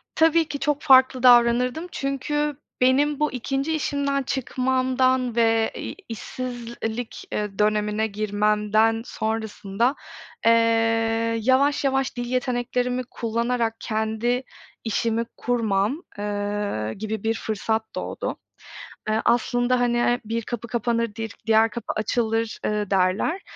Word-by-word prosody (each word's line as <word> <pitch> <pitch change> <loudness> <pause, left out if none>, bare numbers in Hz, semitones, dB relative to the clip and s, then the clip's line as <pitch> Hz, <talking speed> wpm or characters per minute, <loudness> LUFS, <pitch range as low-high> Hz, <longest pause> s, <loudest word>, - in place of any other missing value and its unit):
Tabii 325 0 +4
ki, 285 -1 -5
çok 290 0 0
farklı 260 -2 +5
davranırdım, 245 +6 +5
çünkü 290 +2 -2 0.3
benim 280 +3 +3
bu 300 - +1
2. 270 +5 -2
işimden 280 -2 -1
çıkmamdan, 255 -1 0
ve, 225 -1 +3
iii, - - -6
işsizlik, 235 -1 -5
iii, 210 -1 -3
dönemine 210 +1 +1
girmemden, 210 +2 +1
sonrasında, 220 +2 -1 0.5
ııı, 230 - +7 0.9
yavaş, 270 +5 +3
yavaş, 270 -1 0
dil 245 - -2
yeteneklerimi 250 0 -1
kullanarak, 230 0 -1
kendi 220 +3 -1 0.4
işimi 230 +1 0
kurmam, 230 - 0 0.2
ııı, 205 - -2
gibi 215 0 -5
bir 225 - +1
fırsat 220 0 -2
doğdu. - - -4 0.7
Iıı, 220 +1 +1
aslında, 245 +1 +2
hani, 240 0 +2
bir 230 +2 -2
kapı 235 0 -5
kapanır, 230 -2 -1
di 225 0 -3 0.2
diğer 220 0 +5
kapı 235 +3 -5
açılır, 225 +1 -1
ııı, 210 -2 -1
derler. 195 - +1
235 Hz, 110 wpm, -24 LUFS, 220-255 Hz, 0.9 s, ııı